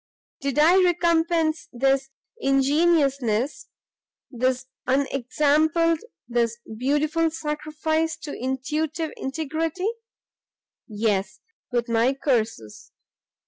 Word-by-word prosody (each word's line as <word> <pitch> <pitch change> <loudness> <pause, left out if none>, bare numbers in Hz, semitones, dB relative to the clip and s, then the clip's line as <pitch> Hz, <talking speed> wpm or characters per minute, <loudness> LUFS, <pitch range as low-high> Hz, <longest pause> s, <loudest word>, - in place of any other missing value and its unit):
"Did 275 -1 -2
I 345 +5 +6
recompense 335 -2 +2
this 270 +2 +1 0.3
ingenuousness? 275 - +2 0.6
this 255 +1 0 0.2
unexampled, 290 +5 +2 0.3
this 235 -1 0 0.2
beautiful 295 +7 +1
sacrifice 315 +1 -2
to 295 - -5
intuitive 300 +5 -2
integrity? 320 +7 -2 1.0
Yes! 205 -3 -1 0.3
with 240 -1 0
my 235 +3 +2
curses! 225 - -2
280 Hz, 75 wpm, -24 LUFS, 255-320 Hz, 1.0 s, I